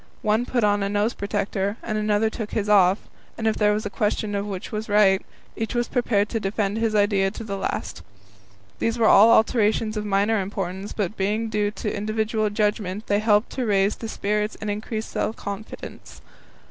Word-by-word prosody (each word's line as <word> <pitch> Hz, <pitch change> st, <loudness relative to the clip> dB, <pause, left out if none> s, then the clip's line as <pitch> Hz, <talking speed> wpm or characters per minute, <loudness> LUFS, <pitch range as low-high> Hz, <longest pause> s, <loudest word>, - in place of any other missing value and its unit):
One 215 Hz, +3 st, +1 dB
put 240 Hz, -3 st, 0 dB
on 205 Hz, 0 st, +3 dB
a 200 Hz, -, 0 dB
nose 205 Hz, +3 st, +1 dB
protector; 200 Hz, 0 st, -2 dB
another 215 Hz, 0 st, 0 dB
took 220 Hz, -2 st, -6 dB
his 210 Hz, -2 st, -1 dB
off; 195 Hz, -2 st, +4 dB, 0.3 s
and 225 Hz, -, -4 dB
if 220 Hz, -1 st, +2 dB
there 210 Hz, -1 st, +3 dB
was 210 Hz, +1 st, -1 dB
a -, -, -2 dB
question 210 Hz, -1 st, -1 dB
of 200 Hz, 0 st, -2 dB
which 190 Hz, -3 st, -6 dB
was 215 Hz, +1 st, -4 dB
right, 200 Hz, -2 st, +4 dB, 0.3 s
each 225 Hz, +1 st, -3 dB
was 240 Hz, 0 st, +1 dB
prepared 225 Hz, -5 st, +1 dB
to 225 Hz, -, -1 dB
defend 200 Hz, 0 st, -1 dB
his 225 Hz, -1 st, 0 dB
idea 200 Hz, -2 st, +3 dB
to 215 Hz, +3 st, -8 dB
the 200 Hz, -3 st, -4 dB
last. 195 Hz, -, -4 dB, 0.8 s
These 230 Hz, +1 st, 0 dB
were 230 Hz, -, +2 dB
all 210 Hz, +3 st, +7 dB
alterations 220 Hz, -1 st, +3 dB
of 210 Hz, -, -2 dB
minor 205 Hz, +1 st, +2 dB
importance, 190 Hz, 0 st, -4 dB
but 205 Hz, -1 st, -2 dB
being 215 Hz, +4 st, 0 dB
due 210 Hz, -1 st, 0 dB
to 210 Hz, 0 st, -4 dB
individual 215 Hz, +1 st, -1 dB
judgment, 210 Hz, -1 st, -1 dB
they 205 Hz, 0 st, +1 dB
helped 210 Hz, 0 st, +2 dB
to 255 Hz, -, -2 dB
raise 200 Hz, 0 st, +2 dB
the 225 Hz, -, -6 dB
spirits 210 Hz, 0 st, -1 dB
and 210 Hz, -1 st, -3 dB
increase 215 Hz, +1 st, -4 dB
self 220 Hz, -, -2 dB
confidence. 200 Hz, +2 st, -8 dB
210 Hz, 190 wpm, -24 LUFS, 200-220 Hz, 0.8 s, all